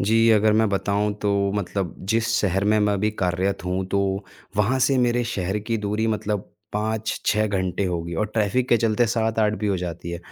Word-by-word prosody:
जी, 115 Hz, +3 st, +4 dB
अगर 110 Hz, 0 st, +4 dB
मैं 110 Hz, 0 st, +3 dB
बताऊँ 100 Hz, +1 st, 0 dB
तो 105 Hz, -, +2 dB, 0.2 s
मतलब 95 Hz, -2 st, -2 dB, 0.2 s
जिस 115 Hz, 0 st, +1 dB
शहर 95 Hz, 0 st, +1 dB
में 105 Hz, +1 st, +3 dB
मैं 105 Hz, -1 st, +2 dB
अभी 105 Hz, +2 st, +1 dB
कार्यत 90 Hz, +1 st, 0 dB
हूँ, 90 Hz, +1 st, -1 dB
तो 100 Hz, 0 st, -1 dB, 0.3 s
वहाँ 110 Hz, +6 st, +2 dB
से 135 Hz, -, +2 dB
मेरे 120 Hz, -1 st, +2 dB
शहर 95 Hz, +2 st, -1 dB
की 110 Hz, +2 st, -2 dB
दूरी 105 Hz, +2 st, 0 dB
मतलब 105 Hz, -2 st, -2 dB, 0.2 s
5-6 110 Hz, 0 st, 0 dB
घंटे 95 Hz, -1 st, -1 dB
होगी 85 Hz, -2 st, -3 dB
और 105 Hz, -, +1 dB
ट्रैफिक 115 Hz, +4 st, +1 dB
के 120 Hz, -, +5 dB
चलते 115 Hz, +1 st, +2 dB
7-8 110 Hz, -1 st, +1 dB
भी 105 Hz, -, -2 dB
हो 100 Hz, -2 st, +1 dB
जाती 85 Hz, -1 st, -5 dB
है। 85 Hz, -, -4 dB
105 Hz, 190 wpm, -23 LUFS, 95-110 Hz, 0.3 s, के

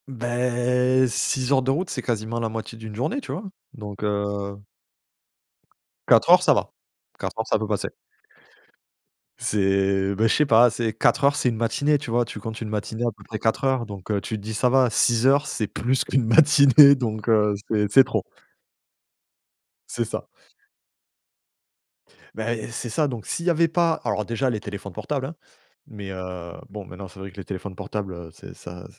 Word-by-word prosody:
Beh, 125 Hz, +1 st, +1 dB
6 125 Hz, +4 st, -1 dB
heures 135 Hz, -1 st, +4 dB
de 130 Hz, -, -2 dB
route, 170 Hz, +7 st, -1 dB
c'est 130 Hz, -, -3 dB
quasiment 115 Hz, -1 st, -2 dB
la 115 Hz, -1 st, -1 dB
moitié 115 Hz, +1 st, -6 dB
d'une 110 Hz, -1 st, -9 dB
journée, 210 Hz, -, -2 dB
tu -, -, -8 dB
vois, 190 Hz, -, -4 dB, 0.3 s
donc 105 Hz, -1 st, -8 dB
heu 100 Hz, -1 st, -2 dB, 1.5 s
4 -, -, +5 dB
heures, -, -, +8 dB
ça -, -, +5 dB
va, -, -, -1 dB, 0.5 s
4 -, -, -5 dB
heures, 110 Hz, -, -2 dB
ça -, -, +1 dB
peut 110 Hz, -, -3 dB
passer. 105 Hz, -2 st, -2 dB, 1.5 s
C'est 95 Hz, -1 st, +1 dB
bah, 110 Hz, +3 st, +2 dB
je -, -, +2 dB
sais 150 Hz, -, +3 dB
pas, 120 Hz, -2 st, +6 dB
c'est 115 Hz, -1 st, -2 dB
4 110 Hz, -, +2 dB
heures, 140 Hz, +1 st, +4 dB
c'est 125 Hz, -, +1 dB
une 115 Hz, -, -3 dB
matinée, 145 Hz, +6 st, +1 dB
tu 135 Hz, -4 st, -7 dB
vois? 120 Hz, +1 st, +2 dB
Tu 110 Hz, -, -8 dB
comptes 110 Hz, +2 st, -7 dB
une 110 Hz, -, -4 dB
matinée 110 Hz, +2 st, -3 dB
à -, -, 0 dB
peu 105 Hz, -1 st, -17 dB
près 110 Hz, +2 st, -6 dB
4 110 Hz, +4 st, 0 dB
heures, 130 Hz, -3 st, +1 dB
donc 100 Hz, -1 st, -7 dB
heu, 100 Hz, -1 st, 0 dB
tu 110 Hz, +3 st, -4 dB
te -, -, -10 dB
dis: 110 Hz, +1 st, -5 dB
«Ça 125 Hz, +3 st, +2 dB
va», 130 Hz, -1 st, +4 dB
6 115 Hz, +2 st, +2 dB
heures, 140 Hz, +3 st, +4 dB
c'est 110 Hz, -, -2 dB
plus 125 Hz, +6 st, -1 dB
qu'une 130 Hz, -3 st, 0 dB
matinée, 140 Hz, +1 st, +7 dB
donc 110 Hz, -5 st, -4 dB
heu, 105 Hz, -2 st, +3 dB
c'est 105 Hz, -2 st, 0 dB
c'est 135 Hz, +4 st, +8 dB
trop. -, -, -2 dB, 1.7 s
C'est -, -, -2 dB
ça. -, -, -6 dB, 2.1 s
Beh, 115 Hz, +2 st, -2 dB
et -, -, -7 dB
c'est 120 Hz, +1 st, -5 dB
ça, 150 Hz, +7 st, +1 dB
donc, 115 Hz, -4 st, -6 dB
s'il 170 Hz, -, -4 dB
y -, -, +3 dB
avait 170 Hz, 0 st, +3 dB
pas 165 Hz, 0 st, +2 dB
alors 105 Hz, -1 st, -1 dB
déjà, 120 Hz, +3 st, -1 dB
les 110 Hz, -4 st, -3 dB
téléphones 100 Hz, -2 st, -7 dB
portables, 135 Hz, -, -3 dB
hein, 155 Hz, +5 st, -7 dB, 0.5 s
mais 100 Hz, -3 st, -8 dB
heu, 90 Hz, -2 st, -7 dB, 0.2 s
bon, 100 Hz, 0 st, -8 dB
maintenant, 95 Hz, +2 st, -9 dB
c'est 95 Hz, -, -15 dB
vrai 95 Hz, 0 st, -8 dB
que 95 Hz, -, -21 dB
les 100 Hz, -, -6 dB
téléphones 95 Hz, 0 st, -6 dB
portables, 100 Hz, 0 st, -5 dB
heu, 85 Hz, -1 st, -9 dB
c'est -, -, -12 dB
ça 90 Hz, 0 st, -10 dB
110 Hz, 195 wpm, -24 LUFS, 100-130 Hz, 2.1 s, heures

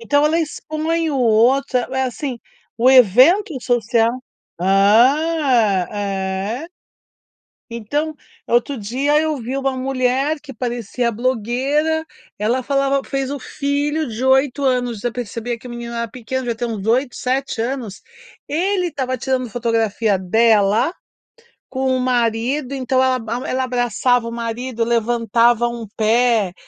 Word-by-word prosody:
Então 285 Hz, +5 st, +2 dB
ela 325 Hz, +2 st, +2 dB
expõe 315 Hz, +1 st, -2 dB
o 275 Hz, -, -1 dB
outro, 250 Hz, +3 st, +3 dB
é 240 Hz, -, -2 dB
é 265 Hz, -, 0 dB
assim, 255 Hz, 0 st, -4 dB, 0.4 s
o 250 Hz, +3 st, +5 dB
evento 265 Hz, -, +5 dB
social. 230 Hz, -1 st, +2 dB, 0.5 s
Hã. 225 Hz, -, +3 dB
É. 200 Hz, +6 st, -3 dB, 1.0 s
Então, 290 Hz, +8 st, -3 dB, 0.3 s
outro 240 Hz, +4 st, +1 dB
dia, 260 Hz, +7 st, 0 dB
eu 310 Hz, -1 st, -1 dB
vi 255 Hz, +2 st, -4 dB
uma 270 Hz, -1 st, -1 dB
mulher 265 Hz, +3 st, 0 dB
que 285 Hz, -2 st, -10 dB
parecia 240 Hz, -1 st, -2 dB
blogueira, 260 Hz, +7 st, 0 dB, 0.3 s
ela 235 Hz, +5 st, 0 dB
falava 275 Hz, +1 st, +1 dB
fez 270 Hz, -1 st, -3 dB
o 285 Hz, -, -3 dB
filho 290 Hz, +3 st, -2 dB
de 230 Hz, +3 st, -4 dB
8 265 Hz, +1 st, +2 dB
anos, 245 Hz, -4 st, 0 dB
já 240 Hz, +2 st, -1 dB
percebia 235 Hz, 0 st, -5 dB
que 250 Hz, -, -13 dB
o -, -, -8 dB
menino 235 Hz, 0 st, -6 dB
era 235 Hz, 0 st, -3 dB
pequeno, 255 Hz, +3 st, -5 dB
devia 235 Hz, -2 st, -3 dB
ter 240 Hz, +1 st, -2 dB
uns 215 Hz, -3 st, -5 dB
8, 250 Hz, +3 st, +1 dB
7 255 Hz, -2 st, -2 dB
anos, 240 Hz, -5 st, -5 dB, 0.5 s
ele 360 Hz, +4 st, 0 dB
estava 260 Hz, -5 st, -3 dB
tirando 255 Hz, -1 st, -2 dB
fotografia 225 Hz, -3 st, 0 dB
dela 220 Hz, -, +3 dB, 0.8 s
com 265 Hz, 0 st, -3 dB
o -, -, -2 dB
marido. 250 Hz, +3 st, 0 dB
Então 260 Hz, 0 st, +1 dB
ela 260 Hz, 0 st, +2 dB
a 235 Hz, +3 st, -2 dB
mu -, -, -7 dB
ela 260 Hz, 0 st, -1 dB
abraçava 245 Hz, -1 st, +1 dB
o -, -, -5 dB
marido 235 Hz, +1 st, -3 dB
levantava 235 Hz, 0 st, +2 dB
um 235 Hz, -1 st, -5 dB
pé, 220 Hz, -3 st, +2 dB
245 Hz, 140 wpm, -19 LUFS, 230-275 Hz, 1.0 s, o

